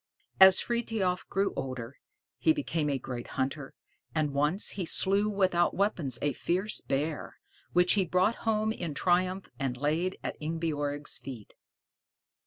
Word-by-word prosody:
As 190 -1 +9
Frithiof 225 -6 -1
grew 195 +1 0
older, 130 0 -5 0.4
he 320 - +4
became 165 - -1
a 140 - 0
great 125 -2 -6
hunter, 135 +1 -2 0.4
and 150 -2 0
once 150 +8 +2
he 195 - -3
slew 200 +5 +3
without 185 -4 +2
weapons 170 - 0
a 145 -1 +1
fierce 185 - -1
bear, 145 +3 -3 0.4
which 180 0 +5
he 200 - +3
brought 185 +6 +1
home 220 -1 0
in 170 -9 -4
triumph 185 +3 +1
and 130 -3 -2
laid 160 +7 0
at - - -5
Ingebjorg's 150 -2 -2
feet. 125 -6 -9
170 Hz, 140 wpm, -29 LUFS, 145-195 Hz, 0.4 s, As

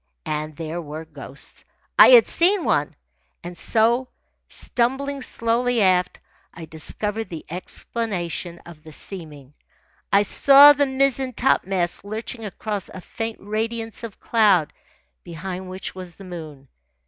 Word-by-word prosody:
And 155 0 -3
there 165 +2 -5
were 155 +1 -8
ghosts. 140 -3 -10 0.4
I - - +11
had 485 -2 +8
seen 365 +2 +3
one. 145 0 0 0.5
And 175 +1 -7
so, 235 +7 +1 0.4
stumbling 270 +3 -2
slowly 240 0 0
aft, 185 -3 +2 0.4
I 165 - -8
discovered 210 +8 -4
the 165 -3 -8
explanation 180 -2 -4
of 170 -3 -13
the 155 0 -12
seeming. 150 -7 -9 0.6
I 200 +1 +5
saw 280 +7 +8
the 285 0 +1
mizzen 265 -1 +1
topmast 190 -9 0
lurching 220 +3 -6
across 205 -1 -5
a - - -9
faint 225 +4 -5
radiance 225 +2 -3
of 225 -4 -8
cloud 205 -9 +3 0.5
behind 185 +2 -7
which 185 +1 -6
was 185 -2 -9
the 195 - -13
moon. 155 -7 -9
195 Hz, 130 wpm, -22 LUFS, 170-235 Hz, 0.6 s, I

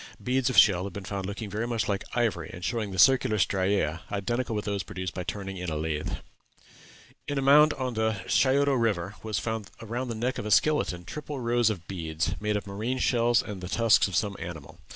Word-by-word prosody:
Beads 130 0 +1
of 130 - -2
shell 95 -3 +6
have 100 - -6
been 100 -1 -7
found 95 -1 -4
looking 100 +2 -5
very 105 +4 -3
much 115 -3 -1
like 100 -1 -1
ivory, 115 -9 0
and 85 0 -7
showing 110 -1 -1
the 95 - -6
circular 110 +3 +5
striæ, 95 -4 +1
identical 115 +4 -2
with 105 - -3
those 100 -2 -1
produced 95 -1 -5
by 90 - -4
turning 95 0 -5
in 90 -1 -4
a 80 - -3
lathe. 75 -1 -2 1.1
In 145 - -2
a - - +1
mound 150 +2 +6
on 130 -2 -3
the 110 0 0
Scioto 140 +4 +3
River 105 -7 0
was 110 -3 -3
found 110 +2 -3
around 120 +3 -4
the 115 - -4
neck 125 +4 -2
of - - -5
a - - -3
skeleton 105 -8 +2
triple 150 +4 -6
rows 120 -1 +2
of 90 -6 -5
beads, 80 -2 -2
made 105 0 0
of 105 - -6
marine 110 +6 -3
shells 120 -2 +2
and 100 -3 -7
the 90 - -6
tusks 115 +2 +4
of 95 - -5
some 105 -2 0
animal. 80 -4 -8
105 Hz, 215 wpm, -27 LUFS, 95-120 Hz, 1.1 s, shell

